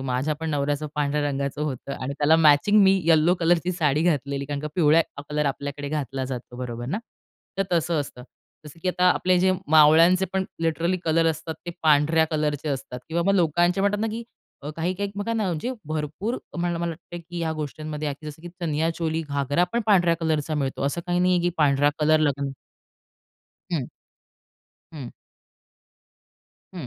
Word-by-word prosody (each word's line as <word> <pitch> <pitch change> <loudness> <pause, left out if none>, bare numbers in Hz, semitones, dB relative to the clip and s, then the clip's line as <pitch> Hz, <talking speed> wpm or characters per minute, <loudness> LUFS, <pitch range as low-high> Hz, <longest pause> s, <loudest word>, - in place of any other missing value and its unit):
माझ्या 135 +3 -1
पण 160 - -2
नवऱ्याचं 145 +1 -1
पांढऱ्या 150 0 0
रंगाचं 140 +1 -3
होतं 140 -2 -4
आणि 130 +2 -3
त्याला 155 +2 +5
मॅचिंग 165 +7 +5
मी 190 0 +4
यलो 165 +2 +5
कलरची 175 +1 +2
साडी 155 -3 +1
घातलेली. 140 -4 0
कारण 145 0 -4
का 150 - -4
पिवळा 160 -2 +5 0.3
कलर 150 0 0
आपल्याकडे 140 +1 -4
घातला 135 -3 -3
जातो. 125 -1 -7
बरोबर 120 -1 -5
ना. 180 +10 -2 0.6
तर - - +4
तसं 165 -1 +1
असतं. 125 -3 -7 0.4
जसं 150 +2 -12
की 185 - 0
आता 180 0 +3
आपले 180 0 +2
जे 185 +1 +3 0.2
मावळ्यांचे 160 +4 +6
पण 190 0 0 0.2
लिटरली 165 +2 +1
कलर 165 0 +2
असतात, 160 +1 -5
ते 175 - -2
पांढऱ्या 155 +1 +4
कलरचे 150 -1 -1
असतात 130 -2 -4
किंवा 170 +1 0
मग 195 - +4
लोकांचे 175 +2 +2
म्हणतात 200 +1 +1
ना, 225 - +1
की 230 +2 -5 0.4
अ, 150 - -5
काही-काही 185 +4 -2
बघा 205 +3 -2
ना, 220 -2 0
म्हणजे 180 +7 -2 0.2
भरपूर 155 - -3 0.2
मला 175 0 -1
मला 170 0 -1
वाटत 170 +1 -9
की 175 - -5
ह्या 160 -1 -1
गोष्टींमध्ये 150 0 -4
जसं 150 +1 -9
की 175 - -7
चनिया 160 -1 0
चोली, 160 -1 -1
घागरा 145 +4 +1
पण 235 - +1
पांढऱ्या 175 -5 +4
कलरचा 155 -1 0
मिळतो. 135 -3 -2
असं 140 +5 -2
काही 175 0 0
नाहीये, 180 0 +3
की 175 - +1
पांढरा 145 -1 +4
कलर 155 +1 +4
लग्न 140 -2 0 1.2
हं. 140 -7 -1 1.0
हं. 140 -6 -7 1.7
हं. 170 -8 -6
155 Hz, 170 wpm, -24 LUFS, 145-175 Hz, 1.7 s, मावळ्यांचे